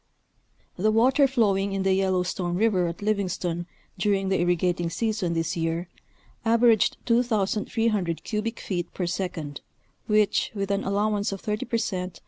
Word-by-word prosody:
The 210 Hz, +4 st, +2 dB
water 260 Hz, +6 st, +4 dB
flowing 200 Hz, -6 st, +1 dB
in 195 Hz, -1 st, -1 dB
the 190 Hz, 0 st, +3 dB
Yellowstone 185 Hz, -2 st, 0 dB
River 190 Hz, -3 st, +2 dB
at 170 Hz, +4 st, -6 dB
Livingstone 180 Hz, -4 st, -1 dB, 0.3 s
during 195 Hz, -2 st, +1 dB
the 190 Hz, -, +1 dB
irrigating 175 Hz, 0 st, +1 dB
season 210 Hz, -1 st, -1 dB
this 165 Hz, -1 st, -1 dB
year 165 Hz, +1 st, -2 dB, 0.5 s
averaged 230 Hz, -1 st, +4 dB
2,300 215 Hz, -5 st, 0 dB
cubic 225 Hz, +1 st, -3 dB
feet 175 Hz, -3 st, -3 dB
per 180 Hz, -, -1 dB
second, 170 Hz, -5 st, -4 dB, 0.5 s
which, 210 Hz, -1 st, +2 dB
with 195 Hz, -1 st, -2 dB
an 200 Hz, 0 st, 0 dB
allowance 205 Hz, +1 st, 0 dB
of 195 Hz, -, -5 dB
thirty 210 Hz, +1 st, -3 dB
per 235 Hz, -, 0 dB
cent. 185 Hz, -5 st, -3 dB
195 Hz, 140 wpm, -26 LUFS, 180-215 Hz, 0.5 s, water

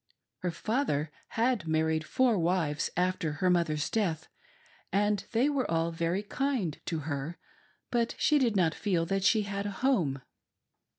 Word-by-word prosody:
Her 180 Hz, -, -1 dB
father 170 Hz, -, -1 dB, 0.2 s
had 230 Hz, -6 st, 0 dB
married 160 Hz, 0 st, +1 dB
four 250 Hz, +3 st, +2 dB
wives 165 Hz, -3 st, 0 dB
after 180 Hz, -4 st, 0 dB
her 180 Hz, +5 st, +1 dB
mother's 155 Hz, -4 st, +1 dB
death, 170 Hz, -8 st, -1 dB, 0.6 s
and 205 Hz, 0 st, +1 dB
they 240 Hz, +4 st, +3 dB
were 280 Hz, -3 st, 0 dB
all 165 Hz, 0 st, +1 dB
very 170 Hz, +4 st, -1 dB
kind 235 Hz, -, -1 dB
to 165 Hz, -3 st, -1 dB
her, 145 Hz, +2 st, -4 dB, 0.5 s
but 235 Hz, -1 st, +1 dB
she 300 Hz, -1 st, +3 dB
did 235 Hz, -5 st, +2 dB
not 170 Hz, -4 st, +3 dB
feel 180 Hz, -5 st, 0 dB
that 195 Hz, +2 st, -1 dB
she 215 Hz, +1 st, +4 dB
had 200 Hz, 0 st, -3 dB
a 200 Hz, -, -7 dB
home. 155 Hz, -, +1 dB
180 Hz, 155 wpm, -30 LUFS, 160-220 Hz, 0.6 s, she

